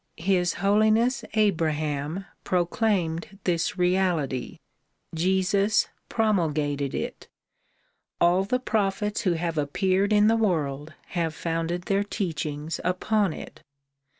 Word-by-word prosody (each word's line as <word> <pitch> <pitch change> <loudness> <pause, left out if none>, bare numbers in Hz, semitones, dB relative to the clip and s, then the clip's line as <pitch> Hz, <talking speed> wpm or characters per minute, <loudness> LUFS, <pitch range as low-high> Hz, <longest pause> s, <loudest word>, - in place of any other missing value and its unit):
His 180 0 +1
Holiness 220 +5 +3
Abraham 155 -4 0 0.2
proclaimed 180 -1 0
this 175 +1 0
reality, 180 -8 0 0.6
Jesus 190 +4 +2 0.2
promulgated 150 - 0
it; - - -5 0.9
all 175 +2 +4
the 250 +6 0
prophets 210 -3 -1
who 185 -6 +2
have 165 -1 -2
appeared 190 +7 +1
in 210 0 +5
the 225 - +4
world 155 -9 -1
have 165 -3 -2
founded 165 +2 -2
their 200 +2 +1
teachings 160 -6 -3
upon 195 +2 +1
it. - - -9
180 Hz, 100 wpm, -26 LUFS, 160-205 Hz, 0.9 s, in